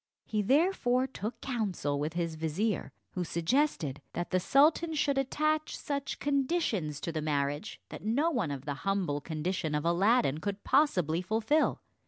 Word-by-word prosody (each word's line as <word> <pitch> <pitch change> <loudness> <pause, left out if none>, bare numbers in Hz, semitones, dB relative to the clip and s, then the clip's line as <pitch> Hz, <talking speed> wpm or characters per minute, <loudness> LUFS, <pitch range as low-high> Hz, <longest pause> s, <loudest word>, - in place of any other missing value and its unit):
He 215 -1 0
therefore 260 - +3
took 235 -3 -6
counsel 195 - -1
with 150 +2 -2
his 170 -1 -1
vizier, 160 +7 -1 0.2
who 180 - -2
suggested 170 - 0
that 175 0 -3
the 185 - +3
sultan 305 - +3
should 280 -2 +2
attach 305 +3 0
such 280 -1 -3
conditions 265 - 0
to 170 - -2
the 160 -1 -2
marriage 145 -1 -1
that - - -8
no 275 +10 +2
one 230 - 0
of 140 -2 -5
the 145 - -2
humble 190 -7 0
condition 160 0 -2
of 150 +2 -1
Aladdin 180 - +3
could 200 +4 -4
possibly 180 - +2
fulfill. 220 - +1
200 Hz, 155 wpm, -30 LUFS, -, 0.2 s, therefore